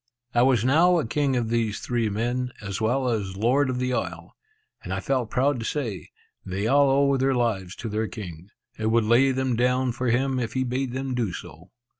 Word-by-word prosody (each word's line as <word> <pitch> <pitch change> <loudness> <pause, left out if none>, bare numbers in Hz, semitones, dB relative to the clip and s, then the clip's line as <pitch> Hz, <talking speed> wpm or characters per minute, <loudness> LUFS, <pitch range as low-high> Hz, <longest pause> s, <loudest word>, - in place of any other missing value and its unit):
I 120 - +4
was 125 -3 +3
now 170 +7 +5
a 160 - 0
king 140 +3 0
of 120 -3 -1
these 115 -3 0
three 120 -3 -1
men, 120 +4 -2
as 100 -1 -5
well 125 +4 +1
as 100 -5 -2
Lord 130 +6 +2
of 130 - -1
the 125 0 -1
isle; - - -4 0.5
and - - -7
I - - -1
felt 130 -5 -1
proud 130 +2 +1
to - - -4
say, 115 -7 -3 0.3
"They 95 +2 -3
all 140 +4 +4
owe 140 +1 +3
their 135 0 +1
lives 100 -7 -1
to - - -6
their 110 +1 -1
king, 90 -5 -9 0.3
and 110 0 0
would 115 0 +3
lay 120 +5 +4
them 130 -1 0
down 125 +2 +1
for 125 +2 -3
him 130 +2 +1
if 115 -3 -3
he 130 - 0
bade 130 0 -2
them 135 0 -3
do 120 -6 -1
so." 85 +1 -10
120 Hz, 215 wpm, -25 LUFS, 110-130 Hz, 0.5 s, now